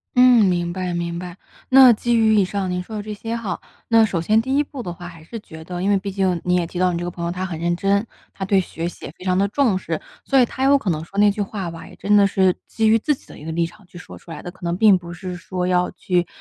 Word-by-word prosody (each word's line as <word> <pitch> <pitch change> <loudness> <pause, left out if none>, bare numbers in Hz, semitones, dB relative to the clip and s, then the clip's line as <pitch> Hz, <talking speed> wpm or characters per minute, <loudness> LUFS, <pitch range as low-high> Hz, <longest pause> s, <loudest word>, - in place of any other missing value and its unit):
嗯， 250 -3 +6
明 175 -2 +1
白 185 -1 -3
明 170 0 -3
白。 180 0 -8 0.3
那 260 -2 +8
基 235 +2 0
于 220 -1 +4
以 200 - +5
上 190 0 -2
您 180 0 -2
说 215 +2 -7
的 - - -3
这 210 0 -6
些 225 +3 -5
哈， 210 -5 -4 0.3
那 225 -1 +5
首 185 -5 -2
先 215 +6 +3
第 265 +3 -1
一 - - +4
步 275 -4 -6
的 175 - -5
话 175 +1 -9
还 165 -2 -12
是 230 +7 -8
觉 160 -5 -12
得 180 +1 -6
因 195 - 0
为 200 - +4
毕 200 +1 -4
竟 185 -3 0
你 180 0 +1
也 175 -2 0
提 175 - -8
到 180 0 +2
你 170 - -2
这 175 - -4
个 - - -2
朋 170 0 -7
友 170 - -1
他 185 +1 -3
很 170 -4 -5
认 170 +1 0
真， 200 +3 +1 0.3
他 190 - -6
对 195 0 +3
学 170 -1 -4
习 - - -12
也 - - -7
非 - - -12
常 185 -1 +1
地 200 +1 +2
重 220 -3 +1
视， 165 -4 -4 0.2
所 275 - +2
以 - - +5
他 265 +3 -3
有 280 +1 +6
可 210 -8 -3
能 155 -2 -1
说 195 - -12
那 205 0 +5
句 205 - -4
话 195 -4 -4
吧， 165 - -10
也 - - -14
真 205 +1 +2
的 200 -1 +5
是 190 -2 +3
基 220 -1 +1
于 225 +1 +5
自 295 +5 +1
己 - - -22
的 - - -13
一 150 - -11
个 160 - -4
立 170 0 +1
场 185 +2 -13
去 180 -2 -13
说 - - -11
出 170 - -14
来 150 - -7
的。 175 - -7
可 180 - -20
能 170 0 0
并 205 -1 +5
不 175 -1 -9
是 180 0 -6
说 180 0 -4
要 180 0 +1
去 180 -1 -1
185 Hz, 335 characters per minute, -21 LUFS, 175-215 Hz, 0.3 s, 那